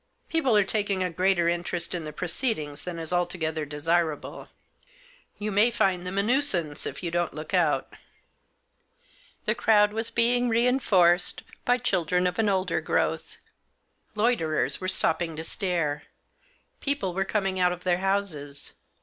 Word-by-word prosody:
People 270 -9 +2
are 205 - +5
taking 200 -2 0
a 180 - -2
greater 180 0 +2
interest 170 0 -2
in 170 -3 -4
the 150 - -5
proceedings 155 - -2
than 180 -2 -5
is 165 +1 -5
altogether 160 -3 -1
desirable. 155 +2 -2 0.9
You 210 0 -3
may 205 +4 +4
find 195 -6 0
them 190 +2 -4
a 200 - +3
nuisance 200 - 0
if - - -7
you 170 - -2
don't 175 -3 -1
look 155 +3 -7
out." 160 -7 +1 1.5
The - - +3
crowd 210 -1 +3
was 225 +1 -3
being 245 +1 +2
reinforced 225 -8 +3 0.2
by 245 0 +3
children 180 -6 0
of 180 +2 -1
an 215 -2 +3
older 190 -1 0
growth. - - -1 0.8
Loiterers 210 -8 +1
were 185 - -2
stopping 165 -2 0
to 160 - -5
stare. 165 -5 -2 0.7
People 280 -11 -1
were 195 +2 0
coming 195 -2 -1
out 180 0 +3
of 180 0 -6
their 180 -1 +1
houses. 180 -8 -2
180 Hz, 150 wpm, -26 LUFS, 165-210 Hz, 1.5 s, are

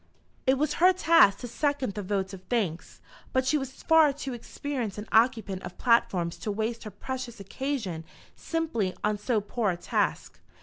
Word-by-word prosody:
It 265 +1 +4
was 300 +2 0
her 365 +1 +8
task 330 - +5
to 245 - -5
second 285 -2 -1
the 210 - -4
vote 195 0 -2
of 190 - -8
thanks, 200 -9 -2 0.3
but 260 0 +2
she 280 - +2
was 270 -2 -4
far 320 -3 +6
too 275 -1 -5
experienced 240 -3 -4
an 210 - -5
occupant 220 -5 +2
of 175 - -8
platforms 185 -8 +2
to 210 - -3
waste 220 +3 -3
her - - -4
precious 245 +3 -6
occasion 200 - -3 0.3
simply 310 - -2
on 210 0 +1
so 220 +1 +1
poor 210 +1 -1
a 175 - -1
task. - - -1
235 Hz, 175 wpm, -28 LUFS, 200-270 Hz, 0.3 s, her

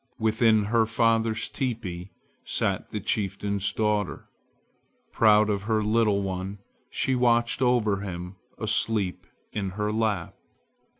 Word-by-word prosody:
Within 110 -1 +3
her 110 +2 +2
father's 115 -1 +1
teepee 105 -9 -4 0.3
sat - - -1
the - - -4
chieftain's 100 -1 -1
daughter. 105 -3 -1 0.8
Proud 105 -1 +5
of 100 -2 0
her 110 -1 +2
little 105 -2 +2
one, 95 +1 -4 0.3
she 130 - 0
watched 120 -1 +2
over 120 -5 +2
him 90 -1 -6 0.2
asleep 110 -3 0 0.3
in 100 -2 -2
her 105 0 0
lap. 105 -5 -1
105 Hz, 115 wpm, -26 LUFS, 100-115 Hz, 0.8 s, Proud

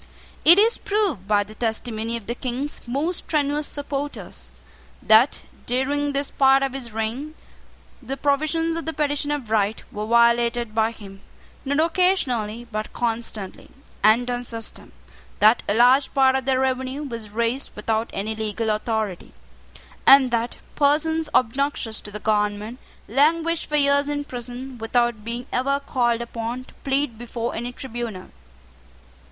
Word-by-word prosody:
It 340 +3 +8
is 445 +3 +4
proved, 400 - -1
by 205 0 +3
the 210 +2 -13
testimony 225 0 -2
of 225 - -11
the 235 - -2
King's 255 +3 -4
most 295 +8 -1
strenuous 295 -1 0
supporters, 285 0 -5 0.5
that, 220 +5 +4 0.2
during 285 +4 0
this 280 0 -2
part 270 0 +4
of 270 -1 -1
his 255 -4 -6
reign, 230 +8 -3 0.7
the 265 +2 -5
provisions 310 +4 0
of 330 - -5
the 320 - -2
Petition 290 0 -1
of 280 -7 -3
Right 215 0 +1
were 210 +1 -4
violated 235 0 +3
by 220 0 +2
him, 195 -4 -12 0.4
not 285 +2 0
occasionally, 270 - +1
but 215 0 -4
constantly, 225 -4 -4 0.3
and 225 +4 +5
on 245 0 -2
system; 230 -2 -9 0.5
that 215 +3 +5
a 205 - +2
large 255 +4 +5
part 265 -1 +5
of 265 -1 -1
the 265 -1 +2
revenue 260 +2 -1
was 230 -6 -6
raised 235 +5 -1
without 220 +2 -1
any 215 +3 -3
legal 220 0 -2
authority; 215 -3 -2 0.7
and 270 -2 +8
that 235 0 -1 0.2
persons 310 +2 +1
obnoxious 255 -2 +1
to - - -7
the 205 - -6
government 210 +2 -1 0.3
languished 320 +7 +2
for 300 - -2
years 285 0 +3
in 290 0 -2
prison, 245 0 -7
without 235 -1 0
being 235 +2 -5
ever 275 +3 +1
called 240 -4 0
upon 235 +1 -4
to - - -19
plead 270 -4 0
before 240 0 -4
any 240 +2 -4
tribunal. 235 -7 -6
245 Hz, 145 wpm, -23 LUFS, 225-280 Hz, 0.7 s, It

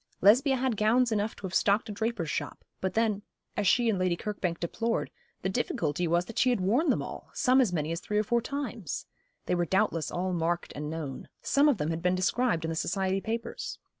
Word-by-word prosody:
Lesbia 255 +8 +5
had 255 -3 0
gowns 235 +4 +3
enough 215 0 0
to - - -16
have 190 -2 -4
stocked 200 +3 +3
a - - -5
draper's 220 -4 -2
shop; - - -4
but 190 - -2
then, 220 -3 +2 0.3
as 205 -2 0
she 240 +4 +4
and 210 -4 +2
Lady 180 -2 +1
Kirkbank 185 -5 -3
deplored, 230 +7 -1 0.3
the - - +1
difficulty 170 -3 -1
was 170 +2 +2
that 230 - -4
she 255 - +4
had 245 - +2
worn 230 - +2
them - - +2
all, - - -8
some 255 +1 +4
as 235 -8 +2
many 155 -2 -1
as 165 - -2
three 210 - -2
or 210 - +3
four 235 +2 +1
times. 240 - -4 0.4
They - - 0
were 175 -1 +2
doubtless 190 -3 +1
all 185 +1 -2
marked 170 0 -1
and 150 +1 -4
known. 155 -4 -5
Some 290 +1 +4
of 270 - +2
them 150 -1 -1
had 165 0 -3
been 180 +1 +2
described 185 -1 +1
in - - -2
the 165 - -2
society 190 +3 0
papers. 230 +2 -4
200 Hz, 225 wpm, -29 LUFS, 175-230 Hz, 0.4 s, Lesbia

